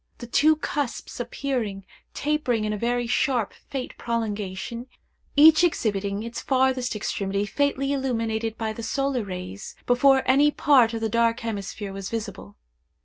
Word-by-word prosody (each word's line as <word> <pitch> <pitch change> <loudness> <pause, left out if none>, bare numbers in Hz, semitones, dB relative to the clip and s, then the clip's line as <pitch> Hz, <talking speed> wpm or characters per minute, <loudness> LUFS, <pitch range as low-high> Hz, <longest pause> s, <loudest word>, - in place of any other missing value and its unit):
The 240 - -8
two 305 +6 +4
cusps 290 -6 -4
appeared 240 -5 -3 0.3
tapering 285 -7 0
in 210 - -1
a - - -2
very 240 +1 0
sharp 240 -2 0 0.2
faint 265 -2 -5
prolongation, 225 0 -3 0.5
each 310 +3 +7
exhibiting 205 - 0
its 230 0 -5
farthest 260 -2 +1
extremity 200 -1 -2
faintly 280 +4 0
illuminated 230 -4 -1
by 220 -1 -2
the 230 - -7
solar 275 +1 -1
rays, 185 0 -7
before 265 +2 +4
any 280 +3 +5
part 260 -6 +4
of 225 - -4
the 225 - +1
dark 230 +1 +2
hemisphere 205 -2 -5
was 195 0 -5
visible. 210 - -6
235 Hz, 145 wpm, -25 LUFS, 210-265 Hz, 0.5 s, each